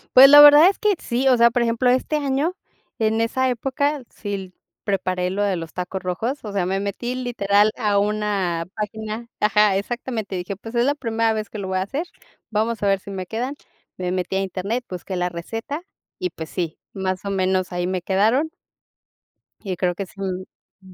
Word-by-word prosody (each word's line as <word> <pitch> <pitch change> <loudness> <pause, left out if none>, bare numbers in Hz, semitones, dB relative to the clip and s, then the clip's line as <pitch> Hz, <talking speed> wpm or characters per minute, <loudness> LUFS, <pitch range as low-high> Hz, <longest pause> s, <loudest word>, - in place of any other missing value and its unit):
Pues, 270 +2 +11
la 290 0 +10
verdad 295 +4 +9
es 395 - -2
que 420 -1 +2
sí, 250 +3 -1
o 260 - +6
sea, 235 0 +6
por 240 0 +1
ejemplo, 235 +2 +2
este 260 +4 +1
año, 285 +5 0 0.4
en 220 0 +1
esa 260 +3 +1
época 275 +3 -1
sí 205 -1 -6
l 190 -2 -7 0.3
preparé 185 -2 -1
lo 200 +2 -2
de 200 -2 +1
los 165 -2 -6
tacos 180 +1 -4
rojos, 225 +10 -3
o 210 - -5
sea, 190 -3 0
me 190 +1 0
metí 205 +5 -3
literal 215 -4 +2
a 210 -4 +1
una 200 -5 0
página 215 +2 -4
ajá, 210 -1 +4
exactamente, 225 -2 -4
dije: 180 +2 -4
"Pues 225 +4 -10
es 235 +1 +3
la 285 - +3
primera 230 -4 0
vez 215 0 -4
que - - -8
lo 200 -2 -4
voy 185 0 -1
a - - 0
hacer, 275 - -3 0.5
vamos 220 +1 -1
a - - +3
ver 195 -1 +3
si 195 - -12
me 190 -2 -4
quedan", 245 +8 -3 0.4
me 180 -1 -2
metí 185 +1 -2
a 195 - +1
Internet, 200 +6 -3
busqué 185 +1 -6
la 180 0 0
receta 225 - -5 0.4
y, 365 -1 -1
pues, 160 - -8
sí, 170 -3 -3 0.2
más 190 0 -3
o 200 - -2
menos, 185 -1 0
ahí 175 0 -1
me 185 -1 -2
quedaron. 220 - +2 1.1
Y 190 -3 -3
creo 180 -1 0
que 195 - -4
sí, 195 - -19
mm 190 0 -8
210 Hz, 205 wpm, -22 LUFS, 185-245 Hz, 1.1 s, Pues